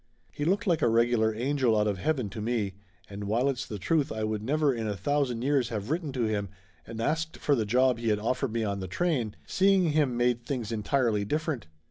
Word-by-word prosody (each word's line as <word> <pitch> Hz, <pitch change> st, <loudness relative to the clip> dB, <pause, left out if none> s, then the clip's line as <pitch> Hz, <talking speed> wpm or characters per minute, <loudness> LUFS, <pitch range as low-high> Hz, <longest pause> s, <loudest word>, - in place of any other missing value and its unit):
He 145 Hz, -, -4 dB
looked 200 Hz, +7 st, +1 dB
like 170 Hz, -5 st, +2 dB
a -, -, +4 dB
regular 115 Hz, -1 st, +2 dB
angel 125 Hz, -1 st, +1 dB
out 105 Hz, -, +2 dB
of 100 Hz, -3 st, -1 dB
heaven 130 Hz, -, 0 dB
to 110 Hz, -, -6 dB
me, 110 Hz, -3 st, -1 dB, 0.3 s
and 100 Hz, 0 st, -7 dB
while 115 Hz, +6 st, +1 dB
it's 135 Hz, -1 st, -2 dB
the 105 Hz, -, -5 dB
truth 145 Hz, -, +1 dB
I 110 Hz, 0 st, -3 dB
would 110 Hz, -1 st, -1 dB
never 145 Hz, +4 st, +1 dB
in 115 Hz, -2 st, -3 dB
a 105 Hz, -2 st, -2 dB
thousand 125 Hz, +2 st, 0 dB
years 135 Hz, -3 st, +2 dB
have 110 Hz, +2 st, -4 dB
written 160 Hz, -3 st, -1 dB
to 125 Hz, -2 st, -1 dB
him 105 Hz, -3 st, -1 dB, 0.4 s
and 115 Hz, 0 st, -7 dB
asked 160 Hz, +6 st, -1 dB
for 145 Hz, -, +1 dB
the 110 Hz, -6 st, +1 dB
job 125 Hz, +1 st, +3 dB
he 115 Hz, -, -3 dB
had 105 Hz, -, +2 dB
offered 125 Hz, +4 st, -1 dB
me 115 Hz, 0 st, -1 dB
on 100 Hz, -2 st, -2 dB
the 95 Hz, -, -4 dB
train, 125 Hz, -, -1 dB
seeing 190 Hz, -3 st, +3 dB
him 145 Hz, -5 st, +1 dB
made 120 Hz, -1 st, +1 dB
things 120 Hz, -4 st, -3 dB
entirely 115 Hz, -1 st, +1 dB
different. 150 Hz, -, -2 dB
120 Hz, 225 wpm, -28 LUFS, 110-145 Hz, 0.4 s, a